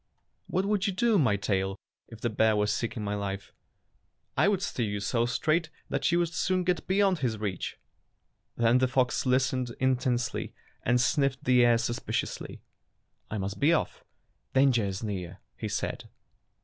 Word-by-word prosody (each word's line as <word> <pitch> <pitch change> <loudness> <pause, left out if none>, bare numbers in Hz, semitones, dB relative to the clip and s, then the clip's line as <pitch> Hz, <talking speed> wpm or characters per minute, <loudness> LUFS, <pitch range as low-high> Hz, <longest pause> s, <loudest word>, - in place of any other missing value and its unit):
"What 185 +2 0
would 205 0 +1
you 200 - 0
do, 220 +2 +3
my 125 -9 +3
tail, 95 -1 -1 0.3
if 115 -1 -12
the 120 - 0
bear 110 0 +3
was 105 0 +1
seeking 115 -1 -3
my 100 0 -2
life?" 100 -1 -4 0.8
"I - - +4
would 200 -2 +1
steer 120 - -1
you 100 0 -2
so 115 +4 0
straight 155 +6 +1 0.2
that - - 0
you 170 - +3
would 170 -1 0
soon 185 +2 +1
get 180 -3 -1
beyond 195 -2 +3
his 120 -5 -1
reach." 100 -4 -4 0.8
Then 120 +2 +4
the 130 - +3
fox 130 0 +1
listened 130 -1 +1
intently 125 -2 0 0.3
and 120 +1 +2
sniflfed 135 +2 +1
the 125 -1 +5
air 120 -1 +5
suspiciously. 120 0 -3 0.7
"I 110 - -3
must 100 0 -4
be 145 - +3
ofif 170 - +1 0.3
— - - -45
dan 135 +1 +6
ger 115 -4 +1
is 95 +2 -4
near," 95 -4 -4 0.2
he 110 - -4
said. 120 +3 -3
125 Hz, 175 wpm, -28 LUFS, 105-155 Hz, 0.8 s, dan